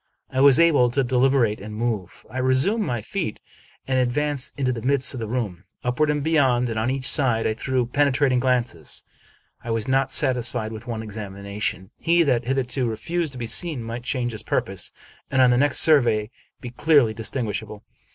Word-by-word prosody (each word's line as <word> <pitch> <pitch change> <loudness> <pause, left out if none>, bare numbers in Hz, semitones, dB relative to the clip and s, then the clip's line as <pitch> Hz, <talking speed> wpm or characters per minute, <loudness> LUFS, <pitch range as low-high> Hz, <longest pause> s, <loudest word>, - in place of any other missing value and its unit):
I 130 - 0
was 140 0 +7
able 150 -7 +4
to 135 +3 0
deliberate 125 -4 +1
and 105 +1 -8
move. 110 -6 -4
I 125 +4 -6
resumed 130 - +1
my 120 - -3
feet, 170 - -4 0.5
and 130 -1 +1
advanced 140 +2 0
into 130 -2 0
the 115 - -6
midst 130 +1 +2
of 130 - -6
the 110 - -4
room. 105 -7 -4 0.2
Upward, 125 +5 0
and 150 -1 -1
behind, 130 -6 +2
and 110 -1 -2
on 110 +3 0
each 130 0 -2
side, 120 -6 +4
I 110 - +1
threw 125 +2 -1
penetrating 140 0 +1
glances. 120 - -2 0.6
I - - -7
was 115 -1 -1
not 135 0 +1
satisfied 125 -5 +2
with 110 +2 -9
one 115 -2 -4
examination. 100 -1 -6
He 170 +1 +3
that 125 -5 0
hitherto 130 -1 -1
refused 160 +7 -3
to - - -9
be 120 - -4
seen 135 +2 0
might 115 +2 -6
change 125 -1 -2
his 110 - -4
purpose, - - -2 0.4
and 135 - 0
on 130 -1 +5
the 120 - +3
next 145 0 +3
survey 120 -8 +4 0.3
be 120 - -7
clearly 140 -4 +3
distinguishable. 110 -2 -4
125 Hz, 185 wpm, -23 LUFS, 115-135 Hz, 0.6 s, was